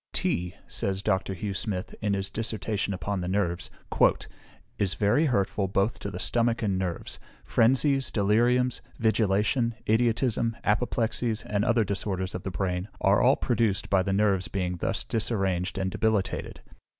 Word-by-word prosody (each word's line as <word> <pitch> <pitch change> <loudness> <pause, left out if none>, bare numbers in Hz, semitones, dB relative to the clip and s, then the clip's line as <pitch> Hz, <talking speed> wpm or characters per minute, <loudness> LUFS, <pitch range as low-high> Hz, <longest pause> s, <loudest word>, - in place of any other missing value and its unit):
"Tea," 90 +1 -1
says 95 0 -2
Dr. 95 +1 0
Hugh 100 +3 -3
Smith, 95 -2 -3
in 105 -2 +1
his 95 0 -3
Dissertation 110 -2 -2
upon 95 +1 -2
the 90 - -3
Nerves, 90 -2 -1 1.1
"is 100 -1 0
very 115 +11 +3
hurtful 100 -4 0
both 100 +4 0
to - - -4
the - - -6
stomach 115 -1 0
and 100 -3 +1
nerves. 90 -3 -3 0.3
Phrensies, 135 +3 +3
deliriums, 120 +5 +2 0.2
vigilation, 110 +1 +1
idiotism, 115 0 +1
apoplexies, 115 0 0
and 105 0 0
other 115 -1 +3
disorders 95 -1 -2
of 90 - -4
the 95 - -4
brain, 90 +1 -2
are 100 +1 +4
all 130 +3 +5
produced 115 -5 0
by 95 -1 +4
the 95 - -1
nerves 100 -2 +2
being 90 -2 -2
thus - - -1
disarranged 95 -5 -1
and 95 -1 -1
debilitated. 110 -1 -1
100 Hz, 150 wpm, -27 LUFS, 95-115 Hz, 1.1 s, all